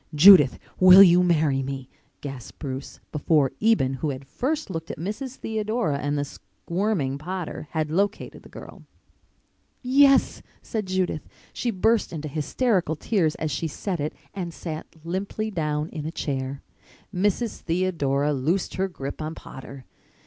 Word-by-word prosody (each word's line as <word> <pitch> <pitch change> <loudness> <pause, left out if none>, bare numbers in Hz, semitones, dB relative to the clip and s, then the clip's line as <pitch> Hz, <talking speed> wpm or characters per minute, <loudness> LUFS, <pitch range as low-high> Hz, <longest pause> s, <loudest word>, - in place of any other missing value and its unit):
"Judith, 150 -4 +8 0.2
will 185 +1 +10
you 180 -1 +6
marry 155 -6 +2
me?" 135 -1 -5 0.3
gasped 135 -5 -8
Bruce, 135 -2 -6
before 150 -2 +2
Eben, 215 -12 +3
who 155 - 0
had 135 0 -5
first 290 - -2
looked 165 -1 -5
at - - -5
Mrs. 215 - -5
Theodora 215 - -1
and 145 0 -1
the 145 - -1
squirming 140 - -3
Potter, 175 -1 -5
had 155 -2 -2
located 200 +5 -1
the - - -15
girl. - - -11 1.0
"Yes," 275 +1 +4 0.2
said 215 -3 -3
Judith. 185 -4 -1 0.3
She 245 - -2
burst 225 +2 +2
into 155 -2 -5
hysterical 165 - 0
tears 165 -2 0
as 155 -1 -3
she 150 +4 -2
said 180 +3 -4
it 150 +1 -2 0.2
and 180 -3 -4
sat 160 -2 -6 0.2
limply 195 +5 -3
down 150 -4 -1
in 155 -2 -5
a - - -4
chair. 135 -3 -4 0.5
Mrs. 205 +5 0
Theodora 150 -5 0
loosed 155 +8 -1
her 190 +1 +1
grip 140 -5 -6
on 155 +1 -4
Potter. 135 0 -10
165 Hz, 150 wpm, -25 LUFS, 145-195 Hz, 1.0 s, will